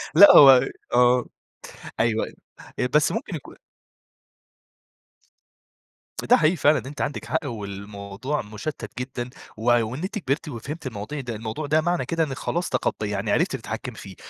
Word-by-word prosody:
لأ، 200 - +10
هو 135 -3 +8 0.3
آه، 125 0 +4 0.7
أيوه، 110 -1 +1
أيوه - - -12 0.4
آآ، 125 - +1
بس 150 -1 +4
ممكن 180 - -4
يكون 150 - -10 2.7
ده - - +8
حقيقي 155 +4 +3
فعلًا 150 -2 +4
أنتِ 140 +2 -7
عندِك 145 - -3
حق، 160 -1 -2
والموضوع 100 +3 -5
مُشتِّت 110 +1 -7
جدًا، 125 -1 -5 0.3
وع 120 +2 +3
وإن 125 +10 -5
أنتِ 205 +4 -3
كبرتِ 155 0 -2
وفهمتِ 140 +5 -6
المواضيع 110 +6 -6
ده 120 -3 -5
الموضوع 110 +8 -5
ده 155 +2 +2
معنى 175 +1 0
كده 165 -1 0
إنِّك 135 -4 -4
خلاص 175 +1 -2
تخطّي 105 -1 -1
يعني 100 -1 -2
عرفتِ - - +1
تتحكمي - - -6
فيه، - - -10
130 Hz, 150 wpm, -24 LUFS, 110-155 Hz, 2.7 s, لأ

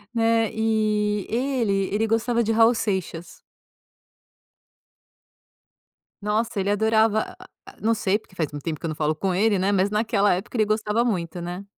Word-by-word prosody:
É, 225 -1 +2
e 215 -2 0
ele 230 -6 0
ele 215 +2 +1
gostava 230 +1 +1
de 225 - 0
Raul 225 +2 +5
Seixas. 185 -5 -4 2.8
Nossa! 210 +1 -1
Ele 195 +1 -1
adorava 220 +1 +2
a - - -12 0.2
a - - -14
Não 230 +1 +2
sei, 205 -1 0
porque 195 - -23
faz 160 -5 -2
muito 145 -1 -8
tempo 160 -2 -2
que - - -8
eu - - -1
não 155 - -4
falo 155 0 0
com 185 +4 -1
ele, 205 +2 +2
né. 190 +2 +1
Mas 195 0 +2
naquela 210 -1 +2
época 195 +7 -4
ele 215 - +3
gostava 215 +2 0
muito, 175 -6 -2
né? 175 +3 -6
210 Hz, 170 wpm, -24 LUFS, 190-225 Hz, 2.8 s, Raul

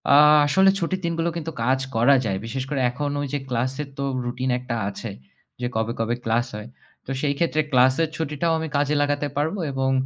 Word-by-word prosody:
আ - - +8 0.3
আসলে 190 +7 +5
ছুটির 185 +2 -2
দিনগুলো 165 0 0
কিন্তু 165 0 -4
কাজ 130 +2 +2 0.2
করা 120 +5 +5
যায়। 95 -3 0
বিশেষ 130 +3 -3
করে 140 - -1
এখন 145 +4 -3
ওই 145 - -2
যে 145 - 0
ক্লাসের 130 +4 -2
তো 140 - -2 0.2
রুটিন 125 +2 -2
একটা 125 -1 -4
আছে - - -6 0.5
যে 125 - 0
কবে, 110 +1 0
কবে 115 +1 0
ক্লাস 115 +2 +1
হয়। 105 +1 -7 0.4
তো - - -6
সেই 145 -1 +1
ক্ষেত্রে 160 -2 +1
ক্লাসের 130 +5 +4
ছুটিটাও 160 +1 -1
আমি 160 - -3
কাজে 145 +1 +1
লাগাতে 145 0 0
পারব 155 +6 0 0.2
এবং 135 0 0
140 Hz, 195 wpm, -23 LUFS, 125-150 Hz, 0.5 s, আ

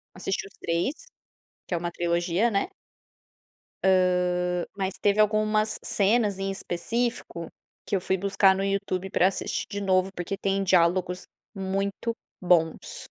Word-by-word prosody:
Assisti 195 +1 -3
os 195 - -20
3. 170 - 0 0.7
Que 180 - -3
é - - +1
um 175 0 -3
trilogia, 175 +6 +1
né. 200 - 0 1.7
Hã, 180 -1 -1
mas 190 -1 -1
teve 205 +1 +3
algumas 215 0 +2
cenas, 205 -1 +2
em 195 0 -1
específico, 195 -1 -3 0.4
que 200 - -1
eu 185 - 0
fui 190 +1 0
buscar 195 0 +4
no 195 - -1
YouTube 195 -1 -1
para 180 - +4
assistir 195 - -2
de 200 0 -4
novo, 190 0 +2
porque 185 +3 -3
tem 195 0 0
diálogos 180 0 +2 0.3
muito 195 +4 -2 0.3
bons. 170 -3 +1
195 Hz, 135 wpm, -26 LUFS, 180-200 Hz, 1.7 s, buscar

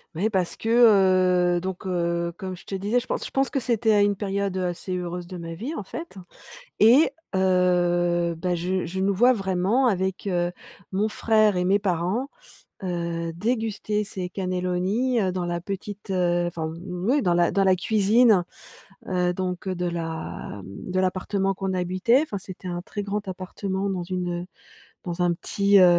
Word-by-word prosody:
Ouais 205 +7 +1
parce 185 -4 0
que, 225 - -4 0.9
heu, - - -2
donc 190 +1 -5
heu, 170 -2 -1
comme 185 -1 -5
je 175 - -15
te - - -8
disais, 205 +6 +1
je - - -11
pense - - -2
je - - -5
pense 270 0 +1
que 275 - -1
c'était 230 -2 +1
à 205 - +5
une 205 0 +3
période, 200 -1 -2
heu, 185 - -1
assez 180 +1 -3
heureuse 175 -1 -4
de 185 - -8
ma 165 -1 -6
vie 245 - -5
en 210 - -4
fait 330 - -8 0.6
et 245 +9 +6 0.2
heu, 175 -2 +2
bah 180 +1 0
je 180 +2 -1
je 190 +3 -4
nous 195 +1 +2
vois 245 +6 +5
vraiment 195 +4 +1
avec, 190 -1 -1
heu, 175 -1 0 0.4
mon 205 +3 +1
frère 215 -2 +3
et 180 - +1
mes 195 +3 +3
parents, 190 +7 -1 0.5
heu, 170 -2 -3
déguster 215 +1 -1
ces 190 -3 -5
cannelloni, 185 +6 0
heu, 190 -2 +1
dans 180 -1 -2
la 175 0 -2
petite, 200 +2 -6
heu 175 -2 +1
enfin, 160 -2 -4
oui 195 +10 0
dans 175 -6 +2
la 175 0 +3
dans 195 +1 +2
la 190 -1 +4
cuisine, 215 +1 +4 0.7
heu, 180 -1 +1
donc 180 0 -4
heu, 190 - -1
de 180 0 -2
la 165 -10 -5
m - - -11 0.3
de 185 - +2
l'appartement 195 +1 0
qu'on 195 0 -3
habitait. 185 +7 +2
Enfin 215 - -5
c'était 185 -1 -9
un 175 0 -4
très 205 +3 -5
grand 205 0 -3
appartement 190 +1 -3
dans 185 -3 -2
une, 175 -1 -3
heu, - - -9 0.6
dans 175 0 -2
un 175 -1 +3
petit, 200 +3 +2
heu, 185 - +8
185 Hz, 185 wpm, -25 LUFS, 175-205 Hz, 0.9 s, heu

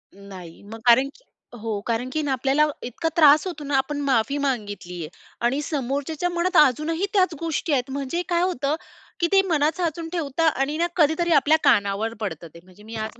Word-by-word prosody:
नाही. 190 -4 -12
मग 225 +2 -10
कारण 260 +3 +5
की - - -22 0.4
हो, 215 -2 -3
कारण 235 +2 -2
की 310 - 0
ना 280 - -1
आपल्याला 270 +4 +2 0.2
इतका 285 +7 -3
त्रास 305 0 +6
होतो 310 -5 -6
ना 285 0 -2
आपण 290 +2 -1
माफी 260 +3 +1
मागितली 210 -10 -3
आहे 155 - -7 0.4
आणि 270 +5 +1
समोरच्याच्या 285 +4 -2
मनात 350 +1 0
अजूनही 320 - 0
त्याच 370 -4 +3
गोष्टी 330 -1 -2
आहेत. 260 0 0
म्हणजे 280 +5 -3
काय 345 0 +2
होतं 295 -5 0 0.4
की 340 - +2
ते 390 0 +6
मनात 310 -1 +1
साचून 330 -1 -2
ठेवतात 320 -1 0
आणि 275 +3 -1
ना 340 +1 +1
कधीतरी 335 +1 +2
आपल्या 305 +2 +4
कानावर 205 +3 +2
पडतं 170 -6 -5
ते. 170 - -13
म्हणजे 185 +3 -18
मी 225 +1 -9
आज 220 +2 -5
280 Hz, 190 wpm, -23 LUFS, 230-325 Hz, 0.4 s, त्रास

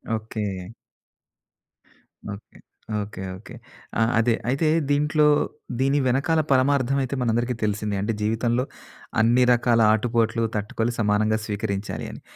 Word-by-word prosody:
Okay. 105 -4 -5 1.6
Okay. 100 0 -10 0.4
Okay. 100 -2 -7 0.2
Okay. 115 +5 -13 0.5
ఆ! - - +3 0.2
అదే. 115 +1 +3 0.2
అయితే, 140 +5 +1 0.2
దీంట్లో, 150 +1 +3 0.5
దీని 135 +2 +2
వెనకాల 145 +6 +2
పరమార్ధవైతే 135 0 +2
మనందరికీ 120 +1 0
తెలిసిందే. 105 0 -1
అంటే, 110 +3 -1
జీవితంలో 115 +3 +1 0.6
అన్ని 120 +3 +4
రకాల 120 -1 +2
ఆటుపోట్లు 115 0 +1
తట్టుకోవాలి, 110 +3 -1
సమానంగా 110 0 +2
స్వీకరించాలి 100 -1 -3
అని. - - -11
115 Hz, 105 wpm, -24 LUFS, 105-130 Hz, 1.6 s, అన్ని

